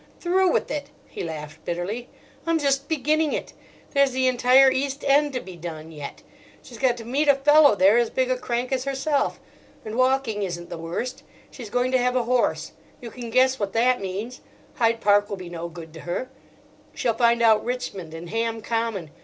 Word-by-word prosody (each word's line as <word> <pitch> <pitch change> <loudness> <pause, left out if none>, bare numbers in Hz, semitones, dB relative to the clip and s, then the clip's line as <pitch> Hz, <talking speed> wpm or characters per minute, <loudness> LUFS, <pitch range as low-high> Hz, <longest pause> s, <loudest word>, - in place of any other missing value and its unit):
"Through 370 +1 +2
with - - 0
it!" 290 -1 -4 0.2
he - - -7
laughed 155 -1 -7
bitterly. 190 +8 -4 0.4
"I'm 330 0 +3
just 275 -2 0
beginning 310 0 +1
it. - - -4 0.4
There's 280 -2 +3
the 260 0 +1
entire 255 +2 +5
East 275 +2 -2
End 285 +1 +4
to 255 - -1
be 185 -6 -10
done 165 -2 -8
yet: 145 -3 -8 0.4
she's 235 - -12
got 255 -2 +2
to 230 - -9
meet 280 +6 0
a 285 - +6
fellow 295 -1 +6
there 200 +4 +5
as 235 -2 +1
big 255 0 0
a - - +2
crank 245 0 -3
as 260 0 -1
herself. 275 +1 -1 0.5
And 215 - -6
walking 255 -3 +1
isn't 175 -3 -5
the 170 - -5
worst. 245 +11 -4 0.3
She's 235 -5 -9
going 245 +3 0
to 260 - +3
have 250 +1 +1
a 250 - +2
horse; 245 +1 0 0.3
you 235 -2 -9
can 240 0 -7
guess 260 +2 +3
what 200 -2 -2
that 245 +1 +2
means.—Hyde 230 +3 -3
Park 205 0 +3
will 200 - -4
be 180 -2 -8
no 170 0 -6
good 165 -2 -11
to 160 - -10
her. 215 +11 -4 0.6
She'll 235 - 0
find 235 0 +3
out 220 -2 +5
Richmond 200 -10 -5
and 170 +1 -8
Ham 225 0 -1
Common. 225 -9 -2
240 Hz, 195 wpm, -24 LUFS, 200-265 Hz, 0.6 s, a